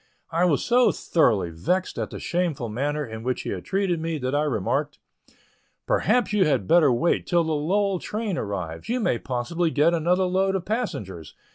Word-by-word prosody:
I 170 +2 +2
was 160 -6 +1
so 245 +1 +4
thoroughly 105 - +1
vexed 180 - -1
at - - -2
the - - -7
shameful 170 -9 -2
manner 145 +6 -2
in 110 -2 -8
which 125 +1 -2
he - - -4
had 90 - -5
treated 190 -3 0
me, 165 -1 -2
that 130 -1 -3
I 145 - +2
remarked; 110 -10 -1 0.9
"Perhaps 220 -1 +1
you 205 -2 +4
had 135 - +1
better 165 -5 +5
wait 125 +8 +1
till 175 -1 +3
the 160 - -2
Lowell 190 +5 0
train 210 -1 -3
arrives; 90 - -5
you 250 +2 0
may 125 - 0
possibly 135 +7 -1
get 155 +2 +3
another 175 +3 +2
load 190 +1 +1
of 185 - -3
passengers. 100 - -4
165 Hz, 185 wpm, -24 LUFS, 120-185 Hz, 0.9 s, better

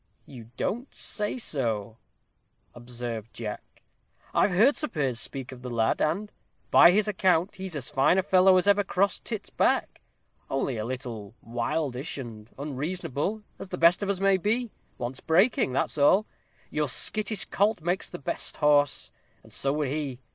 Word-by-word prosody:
"You 115 -5 -12
don't 245 +5 -3
say 210 +3 -1
so?" 115 - -2 0.7
observed 120 -2 -7
Jack. 105 -3 -8 0.5
"I've - - +3
heard 220 +10 +4
Sir 305 - 0
Piers 135 - -1
speak 135 -2 -2
of 130 -1 -11
the 125 - -6
lad; 115 -2 0
and, 195 +7 0 0.4
by - - +8
his 205 +4 +3
account, 185 -2 +1
he's 190 -3 -6
as 135 -5 -3
fine 135 +7 +3
a 190 - +2
fellow 185 -1 +5
as 185 - +2
ever 205 0 +4
crossed 195 +1 0
tit's 220 -4 -5
back; - - 0 0.5
only 135 -2 -1
a 110 - -3
little 115 -4 -6
wildish 130 +4 -3
and 115 -4 -8
unreasonable, 150 - -3 0.2
as 195 - -8
the 180 - -4
best 170 +2 +5
of 200 - -2
us 195 -2 0
may 195 0 +4
be; 220 +5 -1 0.3
wants 125 +2 -5
breaking, 175 - +2
that's 140 - -1
all. 190 +9 +5 0.5
Your 150 -2 -1
skittish 215 - 0
colt 205 -1 +1
makes 175 +4 -1
the 175 - -7
best 140 - -2
horse, 145 -1 +2 0.3
and - - -13
so 135 - +1
would 145 -1 -1
he. 140 -3 -3
150 Hz, 165 wpm, -27 LUFS, 125-195 Hz, 0.7 s, by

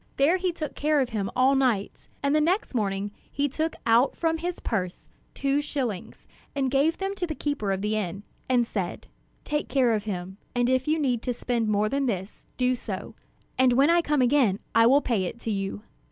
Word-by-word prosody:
There 300 +7 +4
he 370 -1 0
took 310 -3 -5
care 300 0 +1
of 260 -3 +1
him 205 -4 -2
all 260 +2 +4
night; 250 -7 0 0.2
and 280 0 +2
the 305 - +4
next 360 +4 +1
morning 205 -3 -1 0.2
he 285 0 0
took 315 +4 -2
out 230 +4 +4
from 325 -1 0
his 350 +1 -3
purse 185 -5 -3 0.3
two 275 +1 +1
shillings, 255 -10 -4 0.3
and 265 -2 0
gave 285 +5 +2
them 390 0 -2
to 370 -3 -3
the 310 - -4
keeper 285 -11 -2
of 195 +1 -2
the 210 +1 0
inn, 195 -1 -3 0.3
and 245 -2 +3
said: 190 -6 -4 0.4
'Take 295 0 -2
care 255 -4 +3
of 210 -1 -1
him; 190 -2 -5 0.2
and 245 +1 +2
if 260 +1 +1
you 310 +1 +2
need 255 -6 0
to 245 -1 -2
spend 235 -2 -1
more 210 0 +2
than 275 +4 0
this, 195 -3 -4
do 250 0 +2
so; 250 - -5 0.5
and 260 -1 +5
when 275 +6 +5
I 345 0 +5
come 295 -5 +2
again 245 -6 +3 0.2
I 230 0 +6
will 275 +4 +5
pay 220 -9 0
it 225 - -6
to 225 - -2
you.'" 195 +1 -3
255 Hz, 210 wpm, -26 LUFS, 215-290 Hz, 0.5 s, I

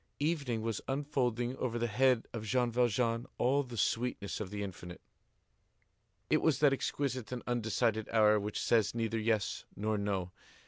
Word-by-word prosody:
Evening 140 -7 0
was 115 -2 -2
unfolding 130 -3 -1
over 120 -2 -2
the 120 - 0
head 125 +1 +3
of 115 -2 -4
Jean 120 +2 +1
Valjean 115 0 +1
all 135 +4 +3
the 125 -4 -8
sweetness 115 -1 -1
of 105 -3 -4
the 100 0 -4
infinite. 90 -2 -8 1.3
It - - +3
was 160 -3 +3
that 145 -2 +5
exquisite 130 -3 -2
and 125 -1 -4
undecided 110 -2 0
hour 105 -1 +5
which 105 +1 -3
says 110 -2 +2
neither 115 -1 -1
yes 110 -2 0
nor 105 +1 -1
no. 95 -3 -2
115 Hz, 155 wpm, -33 LUFS, 105-125 Hz, 1.3 s, that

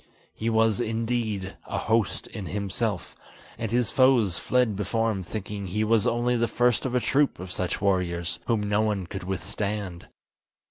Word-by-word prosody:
He 115 - -2
was 110 -2 +3
indeed 110 -4 -2
"a - - -3
host 110 -2 +1
in 100 -5 -7
himself," 100 0 -2 0.4
and 115 - -2
his 120 0 +1
foes 125 -9 +4
fled 125 -5 +2
before 115 +3 0
him 95 -3 -3
thinking 100 +1 -5
he 105 +4 0
was 110 -1 +3
only 120 +1 +2
the 120 0 +2
first 120 0 +2
of 125 - -3
a - - +4
troop 140 +3 +2
of 90 0 -7
such 90 -1 -2
warriors, 90 -3 0
whom 115 -3 +2
no 105 +1 +2
one 105 -4 0
could 95 +1 -6
withstand. 95 -1 -3
105 Hz, 170 wpm, -26 LUFS, 95-115 Hz, 0.4 s, foes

